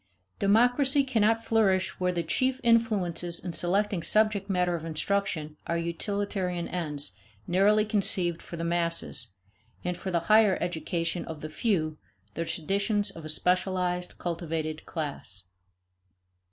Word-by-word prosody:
Democracy 245 Hz, +7 st, +4 dB
cannot 225 Hz, -3 st, +1 dB
flourish 195 Hz, -5 st, +2 dB
where 180 Hz, 0 st, +1 dB
the 170 Hz, -1 st, -2 dB
chief 255 Hz, +10 st, 0 dB
influences 195 Hz, -8 st, +2 dB
in 175 Hz, -1 st, -5 dB
selecting 195 Hz, +2 st, 0 dB
subject 210 Hz, +1 st, +3 dB
matter 180 Hz, -2 st, +1 dB
of 165 Hz, -2 st, -3 dB
instruction 160 Hz, -2 st, -2 dB
are 170 Hz, -, 0 dB
utilitarian 180 Hz, +1 st, -2 dB
ends 150 Hz, -5 st, -3 dB, 0.3 s
narrowly 205 Hz, +4 st, +3 dB
conceived 185 Hz, -5 st, +2 dB
for 170 Hz, -, -8 dB
the 165 Hz, -, -4 dB
masses, 170 Hz, -7 st, +2 dB, 0.6 s
and, 180 Hz, 0 st, -2 dB
for 190 Hz, -, -5 dB
the 170 Hz, -2 st, +1 dB
higher 215 Hz, +1 st, +5 dB
education 170 Hz, 0 st, -2 dB
of 160 Hz, -2 st, -7 dB
the 155 Hz, -, -5 dB
few, 155 Hz, -4 st, -1 dB, 0.3 s
the 165 Hz, -, -3 dB
traditions 200 Hz, +5 st, 0 dB
of 165 Hz, -4 st, -10 dB
a -, -, -1 dB
specialized 180 Hz, +1 st, 0 dB
cultivated 165 Hz, -2 st, -4 dB
class. 140 Hz, -, -3 dB
180 Hz, 130 wpm, -28 LUFS, 165-205 Hz, 0.6 s, higher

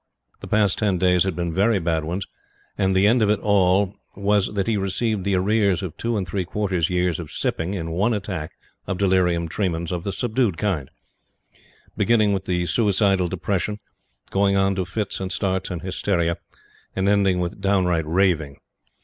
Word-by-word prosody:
The -, -, -9 dB
past 105 Hz, -3 st, +2 dB
ten 100 Hz, -4 st, +1 dB
days 90 Hz, 0 st, +3 dB
had 95 Hz, -4 st, -1 dB
been 85 Hz, -2 st, -2 dB
very 100 Hz, +5 st, +3 dB
bad 80 Hz, -3 st, 0 dB
ones, 90 Hz, +5 st, -3 dB, 0.5 s
and 95 Hz, -1 st, +1 dB
the 95 Hz, +1 st, +4 dB
end 115 Hz, +3 st, +4 dB
of 105 Hz, -, +3 dB
it 105 Hz, -, +2 dB
all 100 Hz, -1 st, +3 dB, 0.2 s
was 100 Hz, 0 st, +1 dB
that 100 Hz, -2 st, 0 dB
he 115 Hz, -, +1 dB
received 100 Hz, +1 st, -1 dB
the 100 Hz, 0 st, +1 dB
arrears 100 Hz, 0 st, +2 dB
of 90 Hz, -5 st, -5 dB
two 115 Hz, -1 st, -2 dB
and 95 Hz, -3 st, -2 dB
three 95 Hz, +2 st, -2 dB
quarter 95 Hz, +1 st, -2 dB
years 90 Hz, 0 st, +1 dB
of 80 Hz, -3 st, -7 dB
sipping 85 Hz, +5 st, -2 dB
in 80 Hz, -3 st, -4 dB
one 100 Hz, +8 st, +1 dB
attack 95 Hz, -7 st, -4 dB, 0.3 s
of 95 Hz, -1 st, -2 dB
delirium 90 Hz, -3 st, +2 dB
tremens 85 Hz, -1 st, -2 dB
of 90 Hz, -2 st, -3 dB
the 100 Hz, -, -2 dB
subdued 115 Hz, -4 st, 0 dB
kind; 85 Hz, -9 st, -1 dB, 1.1 s
beginning 110 Hz, -3 st, +3 dB
with 95 Hz, -1 st, -3 dB, 0.2 s
suicidal 100 Hz, -4 st, +2 dB
depression, 100 Hz, +3 st, -2 dB, 0.5 s
going 100 Hz, 0 st, +2 dB
on 95 Hz, 0 st, +2 dB
to 95 Hz, -1 st, -2 dB
fits 100 Hz, +3 st, -3 dB
and 95 Hz, -1 st, -4 dB
starts 95 Hz, 0 st, -1 dB
and 85 Hz, -3 st, -5 dB
hysteria, 90 Hz, -2 st, 0 dB, 0.6 s
and 95 Hz, +1 st, 0 dB
ending 100 Hz, -2 st, +3 dB
with 90 Hz, +2 st, -4 dB
downright 90 Hz, -5 st, +1 dB
raving. 80 Hz, -5 st, +1 dB
95 Hz, 175 wpm, -23 LUFS, 90-100 Hz, 1.1 s, the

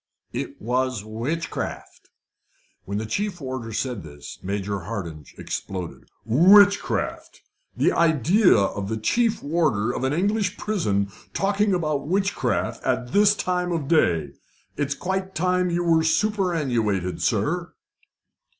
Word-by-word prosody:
"It -, -, -5 dB
was 125 Hz, -1 st, -1 dB
witchcraft." 120 Hz, +10 st, -5 dB, 0.8 s
When 100 Hz, +1 st, -3 dB
the 110 Hz, -, -3 dB
chief 195 Hz, -, -2 dB
warder 130 Hz, -5 st, -5 dB
said 120 Hz, -1 st, -2 dB
this, 75 Hz, -2 st, -11 dB
Major 100 Hz, +1 st, -3 dB
Hardinge 85 Hz, -7 st, -7 dB
exploded. 90 Hz, -3 st, -6 dB, 0.2 s
"Witchcraft! 200 Hz, -, +4 dB, 0.3 s
The -, -, +3 dB
idea 170 Hz, -, +4 dB
of 100 Hz, 0 st, -1 dB
the 110 Hz, -, -1 dB
chief 230 Hz, -, +1 dB
warder 145 Hz, -8 st, +1 dB
of 125 Hz, -, -4 dB
an 130 Hz, -, +1 dB
English 200 Hz, +4 st, 0 dB
prison 100 Hz, -, -1 dB, 0.2 s
talking 200 Hz, 0 st, +2 dB
about 155 Hz, -5 st, -1 dB
witchcraft 195 Hz, +3 st, 0 dB
at 125 Hz, 0 st, -1 dB
this 205 Hz, 0 st, +5 dB
time 180 Hz, -2 st, -1 dB
of 160 Hz, -5 st, -2 dB
day! 85 Hz, -, +2 dB, 0.4 s
It's 140 Hz, -1 st, -1 dB
quite 190 Hz, +2 st, -3 dB
time 180 Hz, +2 st, +1 dB
you 175 Hz, 0 st, 0 dB
were 165 Hz, -1 st, +4 dB
superannuated, 160 Hz, -, 0 dB
sir." -, -, -1 dB
150 Hz, 125 wpm, -24 LUFS, -, 0.8 s, this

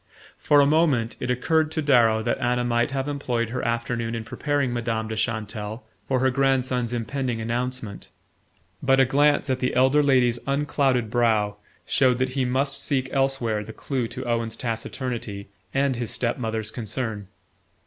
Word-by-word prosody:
For 145 Hz, -1 st, +5 dB
a -, -, +5 dB
moment 140 Hz, -7 st, +2 dB
it 125 Hz, -, -3 dB
occurred 155 Hz, +6 st, +2 dB
to 160 Hz, -, -1 dB
Darrow 115 Hz, -6 st, +4 dB
that 120 Hz, -, -1 dB
Anna 125 Hz, 0 st, +1 dB
might 120 Hz, 0 st, +1 dB
have 135 Hz, 0 st, -2 dB
employed 125 Hz, -5 st, -2 dB
her 125 Hz, +2 st, -3 dB
afternoon 115 Hz, 0 st, -2 dB
in 115 Hz, -, -4 dB
preparing 145 Hz, +2 st, -1 dB
Madame 115 Hz, -2 st, -2 dB
de 110 Hz, -, -4 dB
Chantelle 110 Hz, 0 st, -3 dB, 0.2 s
for 130 Hz, -, +1 dB
her 130 Hz, 0 st, +3 dB
grandson's 130 Hz, -2 st, +1 dB
impending 120 Hz, +1 st, -2 dB
announcement; 120 Hz, -1 st, -3 dB, 0.7 s
but 135 Hz, 0 st, +3 dB
a 135 Hz, -, +6 dB
glance 145 Hz, +2 st, +3 dB
at 130 Hz, -, 0 dB
the 125 Hz, -, -1 dB
elder 130 Hz, +4 st, +4 dB
lady's 125 Hz, -4 st, +3 dB
unclouded 135 Hz, -4 st, +1 dB
brow 110 Hz, -4 st, +2 dB, 0.3 s
showed 130 Hz, -2 st, +3 dB
that 130 Hz, +1 st, 0 dB
he 130 Hz, 0 st, -1 dB
must 135 Hz, +3 st, 0 dB
seek 130 Hz, -3 st, 0 dB
elsewhere 130 Hz, -6 st, 0 dB
the 110 Hz, +2 st, -9 dB
clue 130 Hz, -2 st, -2 dB
to 130 Hz, +2 st, -7 dB
Owen's 115 Hz, -1 st, -1 dB
taciturnity 115 Hz, -3 st, -4 dB, 0.2 s
and 135 Hz, -2 st, +1 dB
his 120 Hz, -2 st, -3 dB
step 120 Hz, 0 st, -1 dB
mother's 110 Hz, -2 st, -3 dB
concern. 110 Hz, -3 st, -4 dB
125 Hz, 165 wpm, -24 LUFS, 115-135 Hz, 0.7 s, a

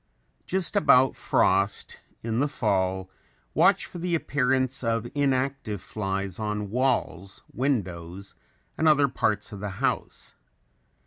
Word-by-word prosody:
Just 190 Hz, +1 st, 0 dB
about 130 Hz, -10 st, +5 dB
frost, 100 Hz, +2 st, +1 dB, 0.2 s
in 115 Hz, 0 st, -1 dB
the 145 Hz, -, +2 dB
fall, 95 Hz, -7 st, -1 dB, 0.4 s
watch -, -, +4 dB
for 175 Hz, -, -8 dB
the 175 Hz, 0 st, 0 dB
appearance 130 Hz, -3 st, 0 dB
of 115 Hz, 0 st, 0 dB
inactive 135 Hz, -6 st, 0 dB
flies 95 Hz, -1 st, -4 dB
on 105 Hz, -2 st, -3 dB
walls, 120 Hz, -7 st, -1 dB
windows 95 Hz, -8 st, -3 dB, 0.5 s
and 160 Hz, -, +3 dB
other 145 Hz, -2 st, +5 dB
parts 105 Hz, -4 st, -1 dB
of 100 Hz, -, -7 dB
the 105 Hz, +1 st, -4 dB
house. -, -, -2 dB
115 Hz, 120 wpm, -26 LUFS, 100-135 Hz, 0.5 s, about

